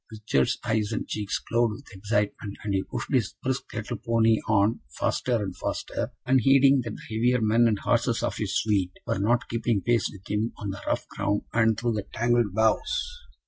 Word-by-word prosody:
Richard's 105 -12 0
eyes 110 -2 0
and 110 - -3
cheeks 105 -2 -2
glowed 115 -1 0
with 140 +4 -12
excitement, 105 0 -2
and 100 - -2
he 95 - +2
pushed 140 - -5
his 120 -6 +1
brisk 130 0 -2
little 110 +1 -4
pony 115 0 +2
on 110 +1 +3 0.2
faster 125 - 0
and 100 -5 -2
faster, - - -3
unheeding 135 +1 +5
that 115 -2 -5
the 110 - -8
heavier 125 +3 +3
men 115 +2 +4
and 110 -2 +2
horses - - +1
of - - -1
his - - -2
suite 100 -4 0
were - - -1
not 120 +4 +1
keeping 115 -2 0
pace 120 -2 +2
with 100 -1 -13
him 105 +3 -1
on 100 -2 -4
the 100 - -7
rough - - -1
ground 100 +1 -1
and 115 -2 +3
through 120 0 0
the 105 -2 -3
tangled 120 -2 +2
boughs. 485 - 0
110 Hz, 190 wpm, -26 LUFS, 105-120 Hz, 0.2 s, unheeding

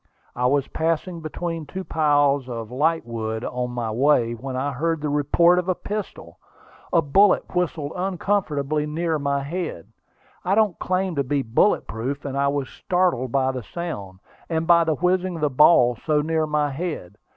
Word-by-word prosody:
I 125 0 +1
was 140 +1 +1
passing 165 +2 -2
between 165 0 -4
two 190 +5 -6
piles 145 -4 +2
of 115 -2 -6
lightwood 120 -6 -1
on 125 0 -3
my 120 -2 -3
way, 120 -1 +2
when 130 +3 -6
I 135 +3 -1
heard 165 +4 -1
the 150 0 -2
report 170 +5 +3
of 180 +1 -3
a 185 - +2
pistol. 210 +3 -6 0.5
A 165 -2 +3
bullet 190 +7 +3
whistled 160 -4 -1
uncomfortably 165 -6 -1
near 160 +1 -1
my 140 -1 -1
head. 160 - -5 0.5
I 190 - +1
don't 215 -5 +2
claim 185 0 -1
to 140 - +2
be 140 +1 -1
bullet 120 - +2
proof, 130 +6 -4
and 140 -1 -4
I 140 0 +1
was 140 -1 -1
startled 175 -9 0
by 130 0 +2
the 130 -1 -5
sound, 100 - -6 0.3
and 160 -1 -1
by 170 -1 +5
the 160 -1 +1
whizzing 180 +2 0
of 165 - -6
the 150 -2 +1
ball 125 -3 +5
so 150 -2 +2
near 160 0 0
my 150 -1 0
head. 135 - -5
150 Hz, 175 wpm, -23 LUFS, 130-170 Hz, 0.5 s, by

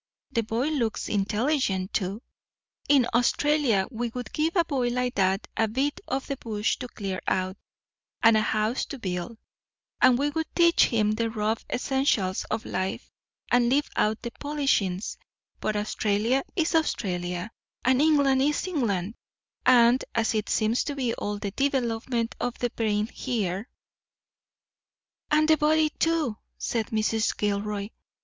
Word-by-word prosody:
The 230 - +1
boy 230 +6 -1
looks 240 -8 -1
intelligent, 210 -1 0
too. 195 +4 -2 0.7
In 270 -4 +5
Australia 245 -3 +2
we 240 0 -2
would 245 -4 -6
give 320 +3 0
a 340 -2 +4
boy 265 -6 0
like 250 0 -1
that 190 +1 +1
a 225 - +2
bit 270 +6 -1
of 270 - -2
the 275 - -4
bush 215 -2 -1
to 250 - -6
clear 195 -5 -5
out, 185 0 0 0.7
and 225 -1 +7
a 215 - +4
house 215 +3 0
to 280 - -7
build, 185 +1 -4 0.6
and 255 -1 +6
we 290 +3 0
would 320 +1 -2
teach 340 -1 +5
him 215 -3 +1
the 225 +1 0
rough 220 0 -1
essentials 250 -8 0
of 220 0 -3
life, 185 0 -3 0.4
and 240 -1 +4
leave 285 +3 +2
out 215 +1 +1
the 235 - -4
polishings; 270 -11 -1 0.4
but 215 - -1
Australia 215 +4 +1
is 330 -2 +1
Australia, 180 - -1 0.3
and 260 +1 +4
England 285 -4 +4
is 295 +4 +1
England; 225 - -1 0.5
and 245 0 +6
as 230 -1 +1
it 215 -1 -1
seems 220 +3 +1
to 285 - -3
be 250 -4 -1
all 205 0 -3
the 205 -1 -4
development 240 -2 -1
of 245 0 -2
the 245 -1 -1
brain 210 -3 0
here——" 215 -4 -3 1.6
"And 310 0 +3
the 315 0 +5
body, 310 0 +3
too," 320 -10 0 0.2
said 225 -3 -2
Mrs. 220 0 0
Gilroy. 205 0 -1
230 Hz, 150 wpm, -26 LUFS, 210-275 Hz, 1.6 s, and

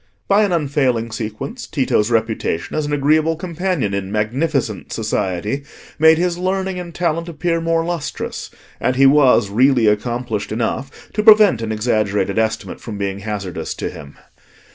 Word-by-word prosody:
By 200 +1 +4
an 200 - 0
unfailing 135 -8 0
sequence, 110 - -5
Tito's 125 -6 +1
reputation 110 -7 -1
as 155 -1 -1
an - - -4
agreeable 155 +3 +2
companion 175 - -2
in 100 -1 -3
"magnificent" 115 - -1
society 105 +2 -2 0.4
made 160 +1 +6
his 175 0 0
learning 190 0 -1
and 175 -1 -7
talent 170 0 -1
appear 165 +1 -1
more 165 0 +1
lustrous: 170 -3 -4 0.3
and 130 - 0
he 135 +1 +5
was 135 -7 +5
really 125 +2 +4
accomplished 115 +1 -1
enough 120 +4 -4
to 210 - 0
prevent 210 - +6
an 110 -1 -3
exaggerated 105 -2 0
estimate 110 0 -2
from 110 -3 -7
being 100 -1 -3
hazardous 100 -3 -5
to - - -4
him. 70 0 -12
130 Hz, 150 wpm, -19 LUFS, 110-165 Hz, 0.4 s, made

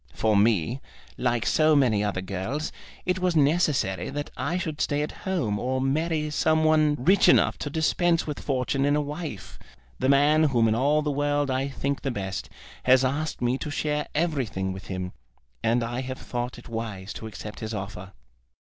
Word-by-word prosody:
For 110 -1 +2
me, 105 +3 +2 0.3
like 120 -2 0
so 155 0 +4
many 115 -7 +3
other 100 -3 -1
girls, 100 +11 -3 0.3
it 180 +1 0
was 180 -2 +1
necessary 145 - +2
that 145 +1 -5
I 170 +5 -1
should 160 -5 -3
stay 145 +1 +1
at 150 - -4 0.2
home 115 - 0
or 130 +2 -1
marry 150 +3 0
some 160 +1 +2
one 155 -1 +4
rich 180 +10 +4
enough - - +4
to 145 - -3
dispense 165 +3 +1
with 150 -2 -4
fortune 135 0 -1
in 145 +1 +3
a - - +2
wife. 150 - -6 0.4
The 130 - +1
man 150 +3 +5
whom 120 -6 +3
in 110 - +3
all 145 +6 +2
the 150 - 0
world 145 0 0
I 130 +1 0
think 140 0 -2
the 135 - -2
best 95 -5 -4 0.4
has 130 +1 +5
asked 145 +1 -2
me 125 +2 +1
to - - -4
share 150 0 -1
everything 130 - -1
with 95 - -9
him; 90 -1 -4 0.5
and 115 +1 +2
I 120 +2 -3
have 130 0 -5
thought 120 +1 -4
it 120 - -12
wise 105 -4 -5
to 110 - -7
accept 105 +1 -8
his 110 0 -4
offer." 95 -1 -7
135 Hz, 185 wpm, -26 LUFS, 115-150 Hz, 0.5 s, man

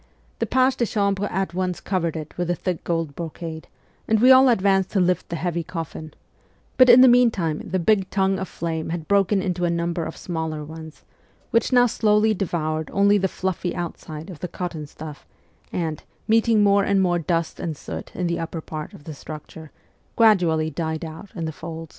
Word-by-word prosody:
' - - -36
The - - -1
pages 260 0 +2
de 235 - +1
chambre 200 -1 0
at 190 -2 -2
once 185 -1 -2
covered 170 -4 -2
it 155 -1 -8
with 175 -1 -2
the 175 - 0
thick 180 +1 -3
gold 165 -4 -2
brocade, 165 -1 -6 0.4
and 220 -1 +3
we 250 +4 +7
all 260 0 +7
advanced 195 -4 +2
to 200 - +2
lift 180 0 +1
the 170 - -3
heavy 170 +1 -2
coffin; 160 -2 -7 0.6
but 255 -1 +6
in 245 +1 +9
the 260 - +9
meantime 230 -11 +3
the 190 - -2
big 190 +1 +2
tongue 195 -1 +1
of 190 - -4
flame 160 -1 -4
had 165 -1 -4
broken 200 -1 +2
into 180 -1 -2
a 175 - +2
number 170 0 -1
of - - -7
smaller 160 -3 -4
ones, 160 +1 -10 0.5
which 230 +3 +2
now 245 -1 +6
slowly 215 -1 +2
devoured 160 -5 -2
only 200 +1 +4
the 190 - +1
fluffy 185 -1 -3
outside 165 -1 -6
of 165 - -11
the 180 - -4
cotton 170 -4 -5
stuff 150 0 -10 0.4
and, 160 -4 -3 0.3
meeting 225 -1 +4
more 200 0 +4
and 200 0 +2
more 175 -1 +1
dust 165 0 -2
and 160 -4 -4
soot - - -7
in 180 - -2
the 170 0 -1
upper 165 0 -4
part 155 -1 -7
of - - -14
the 155 - -7
structure, 155 +2 -10 0.5
gradually 175 -8 +3
died 160 +1 -3
out 160 +5 -9
in 165 -3 -3
the 160 - -3
folds. 165 0 -8
175 Hz, 200 wpm, -23 LUFS, 160-200 Hz, 0.6 s, in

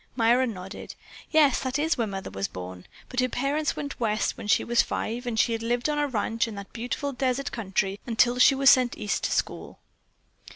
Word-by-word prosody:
Myra 245 +2 +3
nodded. 190 -3 -8 0.3
"Yes, 300 -5 +4
that 260 0 -2
is 320 +3 +1
where 230 -4 -1
Mother 195 -1 -6
was 95 0 -2
born, 90 0 -9 0.2
but 255 - -4
her 255 0 +2
parents 285 +5 -1
went 285 -1 -6
West 215 -2 0
when - - -8
she - - +3
was 240 0 +3
five, 240 +3 -4
and 225 -2 -1
she 230 -1 +3
lived 240 +3 -1
on 300 -1 0
a 295 - +1
ranch 230 -2 -1
in 220 - -7
that 200 -1 -9
beautiful 250 +4 -3
desert 260 +1 -1
country 195 -2 -2
until 240 +1 +2
she 270 - +7
was 275 0 +7
sent 255 -2 +3
East 210 -1 -2
to - - -1
school." - - -2
240 Hz, 205 wpm, -26 LUFS, 215-265 Hz, 0.3 s, she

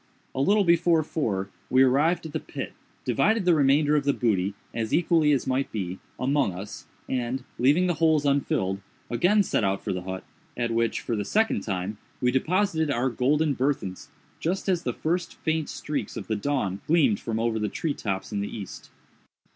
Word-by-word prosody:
A 130 - -1
little 205 +8 +4
before 170 -2 +4
four 100 -12 -2 0.2
we 130 +1 +5
arrived 145 +7 +3
at 160 - -6
the - - -1
pit, - - -6 0.3
divided 210 +7 +2
the 180 - +5
remainder 145 0 +4
of 145 - +2
the 140 0 +2
booty, 100 -5 +1 0.2
as 110 -1 0
equally 165 -3 +3
as 140 - +1
might 130 +1 0
be, 95 -3 -4 0.2
among 135 -5 +1
us, 100 +3 -8 0.2
and, 125 0 -2 0.2
leaving 145 +9 +4
the 180 - +2
holes 155 -2 +2
unfilled, 100 -9 +1 0.3
again 180 - +4
set 145 - 0
out 95 0 0
for - - -1
the 90 - -3
hut, 95 +1 -5 0.3
at 120 -1 0
which, 115 0 0
for 115 - -2
the 105 - -1
second 220 - +1
time, 100 +1 -3 0.2
we 125 -1 +2
deposited 160 +3 +1
our 130 -1 +1
golden 145 +5 +2
burthens, 130 -9 -2 0.3
just 185 +5 -2
as 180 -3 +2
the 125 - -1
first 175 +5 -2
faint 160 -1 -1
streaks 145 -8 -4
of 105 - -5
the 110 - -1
dawn 105 -5 -1
gleamed 145 -10 +3
from 110 -1 -3
over 115 -1 0
the 105 - -1
tree 160 -4 -2
tops 95 -5 -4
in 105 - -1
the 100 - -3
East. 100 -5 -8
135 Hz, 190 wpm, -26 LUFS, 110-160 Hz, 0.3 s, we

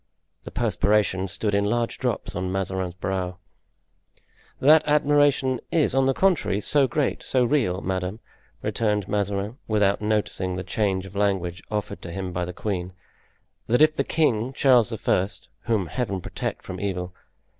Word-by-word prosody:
The - - -6
perspiration 100 -2 +1
stood 100 +3 -2
in 100 0 +3
large 120 +2 -1
drops 125 -5 -2
on 95 -1 -2
Mazarin's 95 -2 -2
brow. 90 -1 -3 1.2
"That 155 +3 +7
admiration 145 -3 +3
is, 155 -5 +2
on 135 0 +3
the 135 - +2
contrary, 180 - +2
so 140 +4 +3
great, 140 +2 -1
so 130 -1 +1
real, 115 -9 +1
madame," 95 +3 -3 0.4
returned 105 -3 0
Mazarin, 100 +3 -2
without 105 -2 +2
noticing 105 -3 -1
the 90 - -4
change 95 0 -1
of 95 +1 -12
language 95 -3 0
offered 105 -1 -3
to 85 - -7
him 95 +1 -4
by 90 0 -2
the 90 - -5
queen, 90 -2 -3 0.7
"that 125 +6 +4
if 155 0 +4
the - - +1
king, 130 -6 +1
Charles 125 -4 +4
I.—whom 105 0 -1
Heaven 100 -1 -2
protect - - -5
from - - -7
evil! 90 -2 -3
105 Hz, 150 wpm, -24 LUFS, 95-125 Hz, 1.2 s, That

